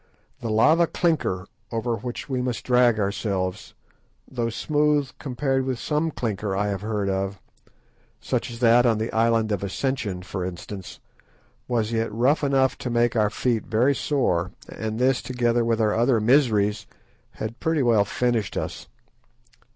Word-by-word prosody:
The 115 - -4
lava 155 +10 +4
clinker, 155 - 0 0.3
over 115 0 -1
which 120 +3 -6
we 130 -3 -1
must 125 -2 -3
drag 125 -3 +4
ourselves, 100 -1 -2 0.5
though 120 -3 -2
smooth 150 +2 +1
compared 135 0 -1
with 130 -1 -2
some 150 +5 -1
clinker 105 -8 -3
I 105 +1 0
have 100 -2 -3
heard 105 -2 -2
of, 95 0 -2 0.8
such - - -2
as 115 - -7
that 120 0 +6
on 115 -2 +3
the 110 +2 -2
Island 115 -1 +2
of 100 - -1
Ascension, 100 -3 -2
for 95 -1 -4
instance, 95 +2 -7 0.7
was 115 -2 0
yet 115 -1 -1
rough 125 +8 +2
enough 135 -2 +2
to 125 - -4
make 120 0 +2
our 105 -2 +3
feet 115 0 -1
very 120 +6 +3
sore, 100 - 0 0.2
and 110 -1 -5
this, 130 +1 +2
together 120 -2 0
with 115 -1 +1
our 105 -2 +2
other 120 +1 +3
miseries, 105 -4 +2 0.5
had 110 +3 -6
pretty 160 -3 +1
well 115 -4 +4
finished 115 +1 -1
us. - - -4
115 Hz, 155 wpm, -24 LUFS, 105-130 Hz, 0.8 s, that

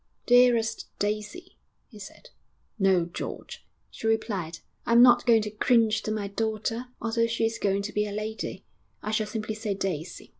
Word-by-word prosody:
'Dearest 240 -2 +4
Daisy!' 215 - -4 0.3
he 215 - -14
said. 355 - -12 0.5
'No, 190 -3 +3
George,' 170 - -7 0.3
she 225 - -5
replied, 200 -7 -1 0.3
'I'm 235 +1 +7
not 245 0 +6
going 225 -2 +5
to 210 - -4
cringe 220 0 +2
to 215 - -3
my 210 -2 -2
daughter, 220 +3 -2
although 230 0 0
she 230 0 0
is 225 0 -2
going 200 0 0
to 210 - -5
be 210 0 0
a - - -6
lady; 215 +2 -5 0.4
I 215 - -3
shall 215 -1 0
simply 215 0 -4
say, 215 -2 -3
"Daisy."' 180 -3 -4
215 Hz, 165 wpm, -27 LUFS, 205-230 Hz, 0.5 s, I'm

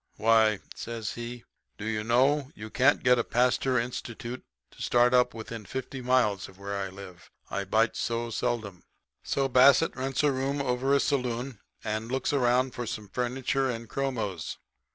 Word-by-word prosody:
"'Why,' 110 -1 +4
says 115 -2 -5
he, 120 0 -7 0.3
'do 105 - -6
you 110 -1 -1
know, 130 +5 +3
you 110 +1 -8
can't 140 +3 +3
get 125 -1 +5
a - - +2
Pasteur 125 +2 +2
institute 120 0 -4 0.3
to - - -14
start 120 +1 +3
up 125 -2 +3
within 115 0 -7
fifty 130 +3 -6
miles 120 -6 +1
of 95 - -17
where 100 +1 -5
I 100 -1 -3
live. 95 -3 -12 0.2
I 100 - -2
bite 110 +4 +2
so 115 0 -2
seldom.' 110 -6 -2 0.4
"So, 135 -1 0
Bassett 135 +4 +5
rents 135 +2 -1
a 145 - +4
room 135 +2 -1
over 135 +1 +1
a - - +4
saloon 125 -3 -1 0.2
and 110 +2 -3
looks 130 +2 0
around 125 -1 +2
for 120 -1 -5
some 105 -2 -5
furniture 130 +3 -1
and 115 -1 -4
chromos. 110 -11 -3
120 Hz, 170 wpm, -28 LUFS, 110-130 Hz, 0.4 s, get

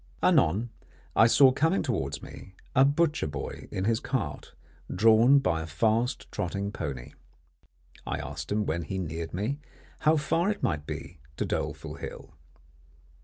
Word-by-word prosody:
Anon 105 +9 +3 0.4
I 110 - +7
saw 130 +2 +7
coming 160 +8 +1
towards 70 - -2
me, 95 - -11 0.2
a 130 - +7
butcher 150 - +2
boy 75 -2 -6
in 95 - -3
his 115 0 +2
cart, - - -4 0.4
drawn 115 +7 +6
by 85 -12 +1
a 80 - -6
fast 110 - 0
trotting 100 +3 -3
pony. 70 - -5 1.0
I - - -1
asked - - -6
him 105 0 +1
when 85 +2 -1
he 85 +4 -4
neared 80 -2 -4
me, 110 +11 -2 0.4
how 155 +1 +4
far 165 +5 +1
it 210 - -3
might 75 -2 -1
be 85 - -7 0.2
to - - 0
Doleful - - -3
Hill. - - -8
105 Hz, 150 wpm, -28 LUFS, 80-135 Hz, 1.0 s, I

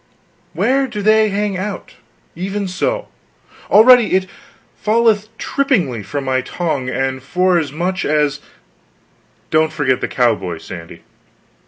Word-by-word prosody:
Where 270 +1 +1
do 210 -4 -5
they 215 0 +4
hang 200 -1 -1
out. 200 +1 -6 0.4
Even 195 +3 -3
so! - - -2 0.6
already 240 +2 +6
it 190 0 +1 0.5
falleth 215 0 +1
trippingly 190 - 0
from 135 +8 -5
my 130 -1 0
tongue, 140 -5 -3
and 130 0 -2
forasmuch 175 +2 0
as 150 -1 +1 0.6
" - - -38
"Don't 155 0 +3
forget 145 -5 0
the - - -1
cowboys, 100 -9 0
Sandy." 85 -2 -10
180 Hz, 120 wpm, -17 LUFS, 135-210 Hz, 0.6 s, already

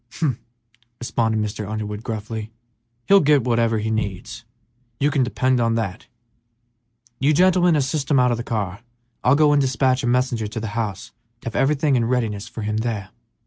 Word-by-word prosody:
"Humph!" 140 -8 -1 0.6
responded 115 -2 0
Mr. 105 -1 -4
Underwood, 105 -1 -4
gruffly; 110 0 -5 0.6
"he'll 200 0 +7
get 145 -5 +3
whatever 115 -2 +1
he 110 +1 -2
needs, 100 -4 -4 0.6
you 145 +1 +2
can 145 -2 +1
depend 130 0 +1
on 115 -1 +1
that. 110 +1 -3 1.1
You 145 +3 +3
gentlemen 180 -1 +4
assist 140 0 -1
him 145 - +4
out 125 -1 +3
of 120 - 0
the 120 - -4
car; 105 -4 -3 0.4
I'll 130 +2 +5
go 150 0 +4
and 145 -1 +4
despatch 130 0 +1
a - - -2
messenger 120 -3 +1
to 110 +2 -5
the 110 -1 -4
house 105 -5 -4 0.3
to - - -20
have 110 - -12
everything 145 0 +2
in 120 -2 +2
readiness 115 -4 -1
for 110 - -7
him 105 +1 -1
there." 110 -4 -3
115 Hz, 180 wpm, -22 LUFS, 110-135 Hz, 1.1 s, he'll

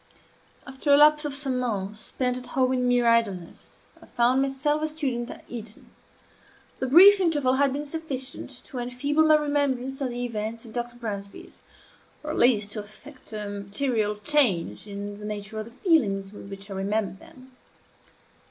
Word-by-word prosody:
After 265 +2 -2
a 285 - +8
lapse 300 +1 +5
of 285 -2 -3
some 270 -3 -2
months, 210 -4 -3
spent 250 +2 -2
at 250 0 -6
home 260 -1 +1
in 250 -1 0
mere 245 -1 +3
idleness, 215 -7 -1 0.2
I - - -16
found 245 +2 +2
myself 275 +3 0
a 310 - 0
student 265 -6 -3
at - - -9
Eton. 225 -2 -8 0.9
The 260 - -1
brief 385 +9 +9
interval 295 -7 +2
had 280 -1 +3
been 290 +2 -4
sufficient 280 -5 -5
to 255 - -8
enfeeble 250 +5 0
my 310 - +7
remembrance 280 -3 -1
of 265 - -1
the 245 0 -4
events 225 0 -5
at 220 - -12
Dr. 240 0 -4
Bransby's, 200 -4 -8 0.6
or 300 - -4
at - - -4
least 210 -5 +4
to 215 - -5
effect 225 +7 -11
a 210 -1 -4
material 205 +2 -2
change 215 - +1
in 205 0 -7
the 210 - -8
nature 210 0 -5
of 215 - -5
the 230 - -13
feelings 215 - +1
with 200 - -11
which 195 +1 -9
I - - -3
remembered 195 0 -2
them. 260 0 -16
245 Hz, 175 wpm, -25 LUFS, 210-280 Hz, 0.9 s, brief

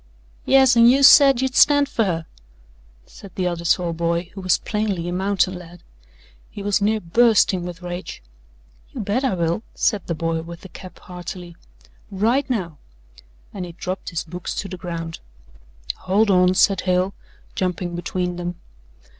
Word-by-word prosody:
"Yes, 265 -2 +5
an' 235 0 +7
you 270 +3 +4
said 275 -2 +7
you'd 265 -1 -1
stand 285 +1 +5
fer 225 - 0
her," 165 -4 -2 0.8
said 195 -3 -14
the 185 - -1
other 175 -1 -2
tall 170 0 +1
boy 170 +1 -2
who 195 - -8
was 185 -2 +2
plainly 205 -5 -2
a 175 - -3
mountain 190 0 0
lad. 175 -1 -11 0.7
He 200 - -8
was 205 0 +1
near 215 +2 +1
bursting 200 -1 +3
with 180 0 -8
rage. 175 - -7 0.7
"You - - -6
bet 210 +6 -1
I 260 -8 +1
will," 170 +2 -1
said 205 -4 0
the 170 - -2
boy 165 +1 -2
with 170 +1 -10
the 190 - -11
cap 185 0 -12
heartily, 180 -1 -9 0.5
"right 225 +8 0
now!" 180 - -3 0.7
and 195 - -5
he 175 -1 -8
dropped 185 +2 -5
his 170 -3 -3
books 175 +1 -6
to 195 - -4
the 190 - -7
ground. 165 -2 -6 0.8
"Hold 200 +3 +1
on!" 180 0 +4
said 195 0 +3
Hale, 185 +1 0 0.4
jumping 180 -1 -3
between 180 0 -3
them. 175 0 -4
185 Hz, 165 wpm, -21 LUFS, 175-210 Hz, 0.8 s, an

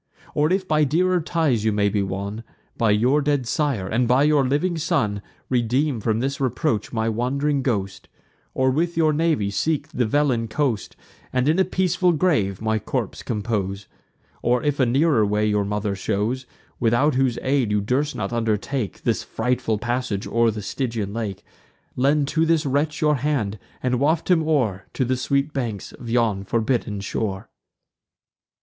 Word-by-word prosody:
Or, 150 +3 +2
if 190 0 0
by 155 -2 +3
dearer 175 +5 +2
ties 155 -9 0
you 110 - +2
may 105 -1 +2
be 100 0 0
won, 100 +3 -4 0.3
By 115 - +1
your 125 +8 +3
dead 145 -3 0
sire, 135 - 0
and 120 +4 +1
by 125 +3 +4
your 150 -2 +4
living 150 +7 0
son, 105 - 0 0.3
Redeem 125 +2 +1
from 110 +1 0
this 140 +2 -2
reproach 130 - 0
my 110 -1 -1
wand'ring 135 +5 0
ghost; 100 -7 -2 0.5
Or 130 0 +2
with 165 +5 -1
your 155 -2 +3
navy 150 -10 +1
seek 155 +9 -1
the 125 -3 0
Velin 125 -3 +1
coast, 125 -5 -1 0.4
And 130 +1 +1
in 160 +5 +3
a - - +6
peaceful 185 -1 +1
grave 125 - +1
my 110 0 +1
corpse - - -3
compose; 105 -3 -2 0.6
Or, 125 0 +1
if 145 -1 0
a 130 - +4
nearer 135 -1 +3
way 105 +1 +1
your 105 -1 +1
mother 105 0 -2
shows, 110 +6 -2 0.3
Without 120 +6 +3
whose 130 -2 +1
aid 130 -4 +1
you 105 0 +2
durst 130 +8 0
not 100 +2 -3
undertake 115 +1 -2
This - - +1
frightful 115 -2 -1
passage 120 -3 -2
o'er 115 0 +2
the 105 -1 -4
Stygian 115 -4 -3
lake, 110 -4 -4 0.5
Lend 140 +2 +2
to 160 +1 +1
this 165 -1 +2
wretch 145 +2 0
your 150 -2 +3
hand, 120 -7 -1 0.2
and 125 -1 +1
waft 160 +5 +1
him 170 -2 +5
o'er 115 -12 0
To 130 - +1
the 130 +2 +1
sweet 140 +3 0
banks 115 -7 -3
of 120 - -10
yon 115 -5 +1
forbidden 110 -1 -1
shore." 100 -1 -3
125 Hz, 170 wpm, -23 LUFS, 105-145 Hz, 0.6 s, a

